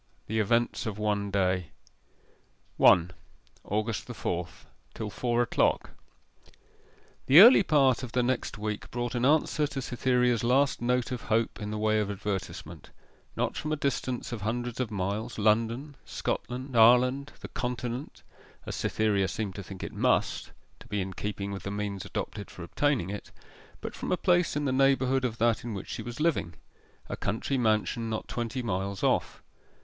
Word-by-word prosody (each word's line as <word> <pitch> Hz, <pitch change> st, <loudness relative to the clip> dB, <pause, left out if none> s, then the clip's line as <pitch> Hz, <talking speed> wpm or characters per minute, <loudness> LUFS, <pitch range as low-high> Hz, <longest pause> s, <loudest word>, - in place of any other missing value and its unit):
IV. -, -, -40 dB
THE 110 Hz, +1 st, 0 dB
EVENTS 115 Hz, +3 st, +1 dB
OF 105 Hz, -2 st, -4 dB
ONE 105 Hz, -1 st, 0 dB
DAY 95 Hz, -3 st, +1 dB, 1.1 s
1. 90 Hz, 0 st, +6 dB, 0.5 s
AUGUST 110 Hz, +2 st, -2 dB
THE -, -, -7 dB
FOURTH. -, -, -4 dB, 0.3 s
TILL 105 Hz, -2 st, -4 dB
FOUR 120 Hz, +2 st, +1 dB
O'CLOCK 120 Hz, -, +1 dB, 1.4 s
The 140 Hz, +5 st, +9 dB
early 230 Hz, +2 st, +10 dB
part 140 Hz, -, +3 dB
of 125 Hz, -3 st, -7 dB
the 125 Hz, -, +2 dB
next 125 Hz, -2 st, -1 dB
week 105 Hz, 0 st, -4 dB
brought 120 Hz, 0 st, -3 dB
an 120 Hz, 0 st, 0 dB
answer 150 Hz, +1 st, +3 dB
to 140 Hz, -, -5 dB
Cytherea's 125 Hz, -2 st, +1 dB
last 135 Hz, +3 st, +2 dB
note 125 Hz, +1 st, 0 dB
of 125 Hz, -3 st, -3 dB
hope 110 Hz, 0 st, 0 dB
in 105 Hz, -, -4 dB
the 105 Hz, -, -3 dB
way 110 Hz, 0 st, +2 dB
of 105 Hz, -1 st, -1 dB
advertisement 100 Hz, -1 st, -5 dB, 0.5 s
not -, -, -1 dB
from 155 Hz, -, -3 dB
a -, -, +2 dB
distance 130 Hz, -4 st, -2 dB
of 115 Hz, -3 st, -5 dB
hundreds 120 Hz, +3 st, -3 dB
of 125 Hz, -4 st, -1 dB
miles, 105 Hz, +4 st, -3 dB
London, 115 Hz, +7 st, +1 dB
Scotland, 125 Hz, +1 st, -4 dB
Ireland, 125 Hz, +5 st, +5 dB
the -, -, -6 dB
Continent 125 Hz, +1 st, -4 dB, 0.4 s
as -, -, -4 dB
Cytherea 105 Hz, -3 st, +1 dB
seemed 100 Hz, +2 st, -3 dB
to 100 Hz, -, -6 dB
think 95 Hz, 0 st, -9 dB
it -, -, -5 dB
must, -, -, +1 dB, 0.3 s
to -, -, -14 dB
be 105 Hz, -3 st, -2 dB
in 95 Hz, 0 st, -3 dB
keeping 100 Hz, +1 st, -4 dB
with 100 Hz, -, -5 dB
the -, -, -5 dB
means 100 Hz, -1 st, -4 dB
adopted 100 Hz, -2 st, -5 dB
for 90 Hz, -, -9 dB
obtaining 120 Hz, -1 st, 0 dB
it, 105 Hz, -, -7 dB, 0.5 s
but -, -, -5 dB
from -, -, -5 dB
a 180 Hz, -, +2 dB
place 175 Hz, -2 st, +2 dB
in 145 Hz, 0 st, -1 dB
the 135 Hz, -, +1 dB
neighbourhood 135 Hz, 0 st, +3 dB
of 115 Hz, -3 st, -1 dB
that 115 Hz, -1 st, +2 dB
in 115 Hz, -3 st, -4 dB
which 95 Hz, -, -7 dB
she -, -, -4 dB
was 120 Hz, +2 st, -7 dB
living 150 Hz, -, 0 dB, 0.5 s
a -, -, -4 dB
country 115 Hz, +6 st, -2 dB
mansion 115 Hz, 0 st, +1 dB
not 110 Hz, -, -3 dB
twenty 120 Hz, +2 st, -3 dB
miles 100 Hz, -2 st, -2 dB
off. -, -, 0 dB
115 Hz, 175 wpm, -28 LUFS, 105-130 Hz, 1.4 s, early